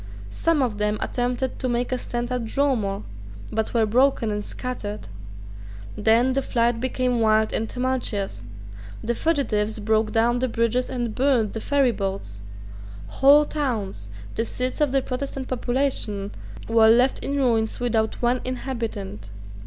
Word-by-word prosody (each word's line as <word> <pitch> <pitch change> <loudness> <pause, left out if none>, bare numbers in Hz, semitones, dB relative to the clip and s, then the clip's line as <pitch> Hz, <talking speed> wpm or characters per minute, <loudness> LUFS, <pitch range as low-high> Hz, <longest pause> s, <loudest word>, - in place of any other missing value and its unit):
Some 325 - +1
of 215 -5 -2
them 210 0 +1
attempted 250 +1 -2
to 255 - -1
make 240 +1 -1
a 255 - +1
stand 240 0 -4
at 250 -1 -1
Dromore, 220 -6 0 0.5
but 220 0 -1
were 225 -1 +4
broken 240 0 +2
and 210 0 -2
scattered. 215 - -5 0.9
Then 230 +4 +3
the 275 - +1
flight 235 -2 +1
became 255 -1 0
wild 220 -1 +3
and 225 - -1
tumultuous. 245 - -2 0.6
The 235 - 0
fugitives 230 -8 0
broke 220 +1 +1
down 240 +2 +2
the 255 - +1
bridges 230 +1 0
and 240 -3 -2
burned 250 -5 +2
the 225 - -4
ferryboats. 195 - 0 0.7
Whole 285 - +6
towns, 220 - -3 0.2
the 225 - 0
seats 255 +5 -2
of 295 -3 +3
the 270 -1 +2
Protestant 265 0 -4
population, 245 -6 -1 0.4
were 225 -1 +5
left 245 +4 +4
in 280 - -3
ruins 230 -5 +1
without 230 -2 0
one 245 +1 +2
inhabitant. 230 - -5
240 Hz, 145 wpm, -24 LUFS, 215-255 Hz, 0.9 s, Whole